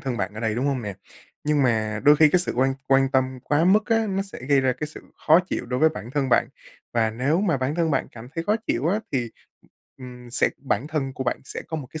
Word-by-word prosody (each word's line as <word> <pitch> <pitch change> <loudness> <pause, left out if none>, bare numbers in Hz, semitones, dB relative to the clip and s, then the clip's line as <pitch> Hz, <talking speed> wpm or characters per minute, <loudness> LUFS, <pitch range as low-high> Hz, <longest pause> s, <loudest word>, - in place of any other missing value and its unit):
thân 130 -3 -3
bạn 100 +2 -3
ở 110 - -6
đây, 110 -2 0
đúng 130 +4 -1
hông 135 -3 -1
nè? 100 -2 -5 0.5
Nhưng 150 -1 +2
mà 110 -3 0
đôi 145 +1 +7
khi 155 0 +6
cái 180 - +4
sự - - -2
quan 135 +1 +2
quan 135 0 +4
tâm 130 -1 0
quá 150 +3 +2
mức 210 +4 +4
á, 225 -1 +2
nó 195 0 -1
sẽ 195 - -10
gây 140 -1 +5
ra 130 -1 +2
cái 150 +5 -5
sự 155 - -11 0.3
khó 160 +3 +7
chịu 125 - -3
đối 125 +1 -2
với 160 - +6
bản 120 -7 -8
thân 135 -1 -1
bạn. - - +3 0.4
Và 110 -2 +2
nếu 140 - 0
mà 170 -9 +1
bản 130 +3 -2
thân 165 -2 +1
bạn 135 - 0
cảm 120 +1 -10
thấy 165 - -3
khó 210 +4 +2
chịu 130 +7 0
á 205 +5 +1
thì, 120 -4 -1 0.7
ừm, 125 -1 -11
sẽ 120 - +2
bản 135 0 -2
thân 140 -4 -2
của 130 - -5
bạn 120 - -1
sẽ - - -6
có 160 - -3
một 140 -5 -6
cái 155 - -7
135 Hz, 270 wpm, -24 LUFS, 125-155 Hz, 0.7 s, đôi